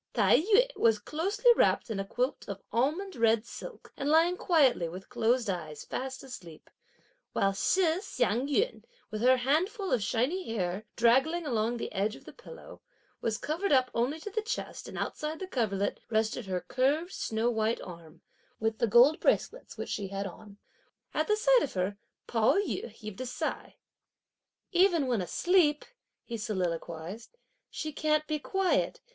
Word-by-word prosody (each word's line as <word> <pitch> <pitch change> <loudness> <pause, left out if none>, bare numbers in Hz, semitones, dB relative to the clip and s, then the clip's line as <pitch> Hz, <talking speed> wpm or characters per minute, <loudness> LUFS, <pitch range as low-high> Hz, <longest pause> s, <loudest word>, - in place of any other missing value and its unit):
Tai - - +5
yü 430 +8 +4
was 225 -2 +3
closely 395 - +2
wrapped 235 - +2
in 205 - -2
a - - -1
quilt 250 +4 -2
of 200 -1 -6
almond 315 - 0
red 230 -1 +3
silk, - - -10
and 280 - -2
lying 330 +3 +4
quietly, 275 - +3
with 185 +3 -9
closed 235 +1 +1
eyes 155 -6 -4
fast 260 0 -5
asleep; 175 -12 -11 0.6
while 195 0 +2
Shih 335 - +2
Hsiang 250 - 0
yün, 435 - 0 0.3
with 215 0 -4
her 255 +2 +5
handful 350 - 0
of 240 - +2
shiny 255 - -1
hair 185 +1 -2
draggling 265 +9 +3
along 235 -3 0
the - - -5
edge 210 +3 0
of - - -15
the - - -11
pillow, - - -12 0.4
was 220 -1 -1
covered 335 - -2 0.2
only 245 +6 0
up 320 - -13
to 415 - -6
the 435 - -1
chest, 460 +4 -5
and - - -8
outside 305 +1 -3
the 380 - -5
coverlet 215 - -1
rested 220 0 0
her 185 -1 -2
curved 290 +7 +1
snow 225 +2 -1
white 220 0 0
arm, 170 -1 -11 0.4
with 220 0 -1
the 235 - +2
gold 245 +8 +6
bracelets, - - 0
which - - -5
she 200 - -3
had 195 +1 -4
on. 200 +2 -10 0.6
At 310 - 0
the 425 - +3
sight - - +5
of 265 - -3
her, 190 +2 -1 0.3
Pao 225 -2 +2
yü 400 -10 -1
heaved 215 -1 -9
a 255 - -3
sigh. 250 - -4 1.0
"Even 350 -5 +4
when 240 -6 0
asleep," 305 - +2 0.4
he 235 - -5
soliloquised, 185 - -4 0.3
"she 310 -1 -5
can't 305 +1 +1
be 305 -1 -2
quiet! 385 +5 0
245 Hz, 165 wpm, -30 LUFS, 215-325 Hz, 1.0 s, gold